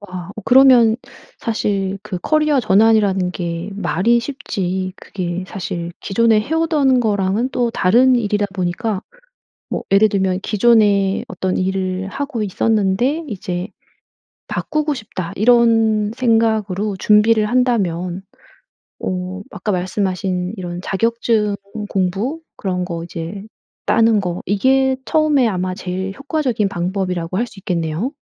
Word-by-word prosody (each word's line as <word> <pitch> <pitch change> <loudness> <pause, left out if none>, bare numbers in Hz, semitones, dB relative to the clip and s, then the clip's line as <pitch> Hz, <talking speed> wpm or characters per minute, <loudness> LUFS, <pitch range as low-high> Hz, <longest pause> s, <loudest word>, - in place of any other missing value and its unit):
와. 185 -3 -8 0.2
그러면 250 -4 +6 0.4
사실 200 -3 -1
그 185 - -5
커리어 305 -3 +2
전환이라는 205 -3 +3
게 170 0 -4
말이 205 +4 +1
쉽지 190 -8 -3
그게 180 -1 -5
사실 175 -4 -5
기존에 225 +1 +2
해 285 +9 -3
오던 300 -6 +2
거랑은 210 +2 0
또 245 -2 0
다른 245 +6 +4
일이다 210 -3 0
보니까 190 +3 -2 0.7
뭐 - - -2
예를 205 +2 +5
들면 190 -2 0
기존에 205 -3 +3
어떤 185 0 -2
일을 190 0 -2
하고 275 0 -4
있었는데 220 - +1
이제 180 -3 -4 0.8
'바꾸고 305 0 -1
싶다.' 190 -7 -6
이런 225 -2 +3
생각으로 220 -4 +1
준비를 215 +2 +4
한다면 195 -7 0 0.8
어 185 +1 -3
아까 210 - -3
말씀하신 185 0 -2
이런 175 -2 -5
자격증 220 0 0 0.3
공부 200 - -1 0.2
그런 180 -2 -2
거 170 -2 -5
이제 170 +3 -6 0.4
따는 225 -2 +4
거 180 -2 -3
이게 265 +6 +2
처음에 300 -6 +3
아마 185 -2 -2
제일 190 +1 -4
효과적인 275 -8 -1
방법이라고 180 -1 -2
할 240 - 0
수 210 -3 -15
있겠네요? 175 - -2
205 Hz, 265 characters per minute, -19 LUFS, 185-235 Hz, 0.8 s, 그러면